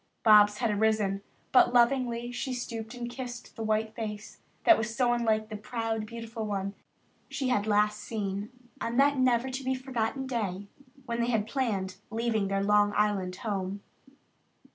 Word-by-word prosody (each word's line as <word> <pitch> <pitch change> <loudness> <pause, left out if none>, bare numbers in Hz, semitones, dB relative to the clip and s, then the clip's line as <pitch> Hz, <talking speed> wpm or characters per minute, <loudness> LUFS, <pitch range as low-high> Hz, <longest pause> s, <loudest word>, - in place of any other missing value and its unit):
Bobs 210 -1 +7
had 230 0 +1
arisen, 210 -2 +1 0.3
but 250 -1 +5
lovingly 240 -1 +2
she 255 +1 -3
stooped 230 -1 -5
and 240 -1 -4
kissed 245 0 -7
the - - -7
white 220 0 0
face 210 -2 -6 0.2
that 340 - +8
was 225 -2 -3
so 245 -1 +3
unlike 220 -2 +1
the 215 - -5
proud, 225 0 -3
beautiful 230 0 -6
one 200 -2 -2 0.6
she 270 -2 -2
had 210 -4 +1
last 210 0 +2
seen 205 -1 -4 0.3
on 235 +1 -2
that 280 0 +4
never 255 0 +2
to 260 +1 -4
be 260 0 0
forgotten 255 0 -2
day 205 -7 -3 0.4
when 235 -1 -2
they 235 - +1
had 220 -3 +1
planned 210 -7 -2
leaving 220 -2 0
their 195 0 0
Long 205 0 +4
Island 200 -3 +1
home. 200 -1 -3
225 Hz, 165 wpm, -29 LUFS, 210-245 Hz, 0.6 s, that